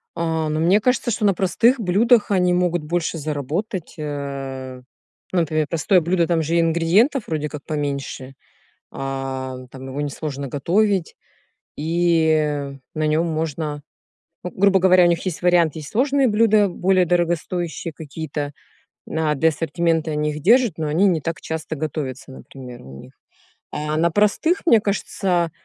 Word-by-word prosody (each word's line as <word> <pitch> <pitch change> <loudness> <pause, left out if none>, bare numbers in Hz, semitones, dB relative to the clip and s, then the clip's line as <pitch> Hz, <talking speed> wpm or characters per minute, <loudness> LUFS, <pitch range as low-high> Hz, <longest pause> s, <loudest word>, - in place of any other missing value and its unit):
А, 160 -2 -1
но 155 +1 -1
мне 180 +6 +4
кажется, 250 +2 +1
что 210 - -1
на 200 - +4
простых 230 +8 +2
блюдах 220 +3 +3
они 180 -2 +3
могут 175 -2 +1
больше 170 +1 -2
заработать, 155 - -4
э. 135 -3 -5 0.5
Ну, 185 - +3
например, 155 -1 0
простое 180 +3 +3
блюдо- 170 +1 +1
там 170 -2 +1
же 160 +2 -1
и 170 - +4
ингредиентов 170 - +2
вроде 150 -2 -2
как 145 -2 -8
поменьше, 140 -3 -4 0.6
а, 135 -1 -4 0.2
там 135 0 -9
его 135 +2 -5
несложно 145 -1 -4
готовить, 185 - 0 0.6
и 155 -3 +1 0.2
на 155 0 0
нём 155 +3 +1
можно, 155 -2 -3 0.6
ну, 180 - -5
грубо 195 0 +3
говоря, 185 0 +5
у - - +5
них 170 +1 0
есть 180 -4 -3
вариант: 175 -3 +3
есть 155 -2 -7
сложные 270 +3 +2
блюда, 210 -1 +4
более 185 +1 +2
дорогостоящие 175 0 -1
какие-то, 150 -1 -6 0.5
на 160 -1 0
для 160 +3 +3
ассортимента 165 +1 -1
они 150 0 -1
их 150 0 -7
держат, 230 - +4
но 160 - -3
они 165 +7 +3
не 175 -5 +2
так 165 +4 -4
часто 160 0 -5
готовятся, 140 -4 -5
например, 130 -2 -11
у 65 0 -11
них. - - -14 0.6
А 150 +1 -3
на 170 +2 +3
простых, 210 - +2
мне 235 -10 +6
кажется, 185 -4 -1
165 Hz, 155 wpm, -21 LUFS, 150-185 Hz, 0.6 s, мне